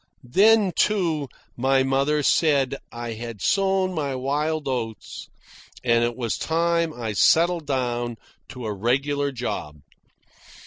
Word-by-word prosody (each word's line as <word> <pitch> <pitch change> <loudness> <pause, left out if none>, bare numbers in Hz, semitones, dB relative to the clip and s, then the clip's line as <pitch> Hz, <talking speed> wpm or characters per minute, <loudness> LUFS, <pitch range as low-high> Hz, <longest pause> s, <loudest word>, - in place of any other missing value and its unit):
Then, 210 -1 +5
too, 165 -9 +1 0.3
my 135 +2 +2
mother 140 +3 +1
said 140 -3 +2
I 120 -1 -5
had 115 -1 -7
sown 190 - +1
my 145 -5 -2
wild 145 +4 -1
oats 115 -6 -5 0.5
and 115 -1 +3
it 120 0 -1
was 120 -3 -3
time 170 0 +1
I 115 -6 -5
settled 165 - +3
down 120 -3 -2 0.3
to 125 -2 -8
a 105 - -2
regular 140 +7 0
job. 80 - -5
135 Hz, 125 wpm, -24 LUFS, 120-160 Hz, 0.5 s, Then